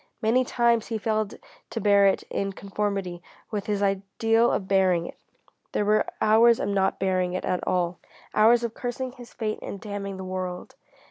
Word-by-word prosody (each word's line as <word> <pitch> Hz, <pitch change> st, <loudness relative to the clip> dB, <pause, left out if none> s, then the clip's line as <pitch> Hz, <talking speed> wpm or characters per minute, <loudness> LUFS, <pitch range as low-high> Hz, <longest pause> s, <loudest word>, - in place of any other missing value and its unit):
Many 230 Hz, +4 st, +3 dB
times 235 Hz, -2 st, +1 dB
he 225 Hz, -, -2 dB
failed 215 Hz, -1 st, -1 dB, 0.3 s
to 230 Hz, -, -4 dB
bear 200 Hz, -2 st, +5 dB
it 195 Hz, -, +1 dB
in 195 Hz, 0 st, -2 dB
conformity 195 Hz, -3 st, -3 dB, 0.3 s
with 205 Hz, -3 st, -3 dB
his 205 Hz, -1 st, 0 dB
ideal 200 Hz, +4 st, +2 dB
of 190 Hz, -, -2 dB
bearing 185 Hz, -3 st, +3 dB
it. -, -, -10 dB, 0.5 s
There 205 Hz, -, +1 dB
were 215 Hz, +1 st, +3 dB
hours 225 Hz, +2 st, +5 dB
of -, -, -1 dB
not 195 Hz, -1 st, +1 dB
bearing 185 Hz, -1 st, 0 dB
it 185 Hz, -, -3 dB
at 180 Hz, -, -1 dB
all; 175 Hz, -1 st, 0 dB, 0.3 s
hours 230 Hz, +3 st, +5 dB
of 235 Hz, -1 st, -2 dB
cursing 250 Hz, +1 st, -4 dB
his 245 Hz, -2 st, -13 dB
fate 215 Hz, -2 st, -3 dB
and 200 Hz, -, -6 dB
damning 200 Hz, -2 st, -5 dB
the 190 Hz, -, -6 dB
world. 185 Hz, -1 st, -5 dB
205 Hz, 180 wpm, -26 LUFS, 190-225 Hz, 0.5 s, bear